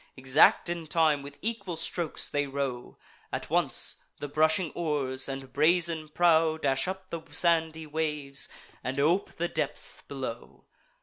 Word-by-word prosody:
Exact 130 +5 +4
in 170 -2 -3
time, 155 -3 +3
with 140 +1 -10
equal 220 -6 -3
strokes 165 0 0
they 145 -1 -1
row: 135 -3 -4 0.3
At - - -5
once - - +2 0.2
the 145 - -5
brushing 155 +3 +2
oars 140 -5 -1
and 135 -1 -7
brazen 160 +1 +3
prow 160 -1 +3
Dash 135 0 0
up 190 0 -6
the 170 - -4
sandy 160 -2 +2
waves, 150 -3 -2 0.3
and 130 +2 -3
ope 170 +7 +2
the 175 - -2
depths - - -3
below. - - -7
155 Hz, 140 wpm, -28 LUFS, 140-170 Hz, 0.3 s, Exact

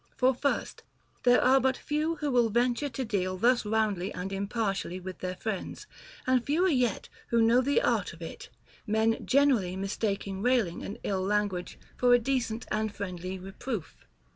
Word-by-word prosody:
For 260 +1 +4
first, 280 +3 -2 0.4
there 245 0 +5
are 265 +2 +6
but 265 0 +1
few 305 +2 -1
who 295 -3 -2
will 240 -2 +3
venture 245 +5 +1
to 260 +1 -4
deal 185 -4 -1
thus 240 +5 +3
roundly 210 -3 0
and 190 +2 -4
impartially 195 -2 -2
with 185 0 -8
their 185 0 -3
friends, 205 0 -5 0.4
and 255 -1 +3
fewer 335 +8 +2
yet 250 - +1 0.2
who 235 - +2
know 230 +2 +5
the 285 - +2
art - - +1
of - - -13
it, - - -8 0.4
men 220 +1 +1
gener 280 -4 +4
ally 180 0 -5
mistaking 195 0 -2
railing 230 -8 +1
and 205 - -6
ill 190 -2 -1
language 200 -2 -1 0.2
for 245 -1 +5
a - - +6
decent 240 -2 -1
and 215 0 0
friendly 185 -1 -5
reproof. 195 - -6
220 Hz, 170 wpm, -29 LUFS, 195-255 Hz, 0.4 s, are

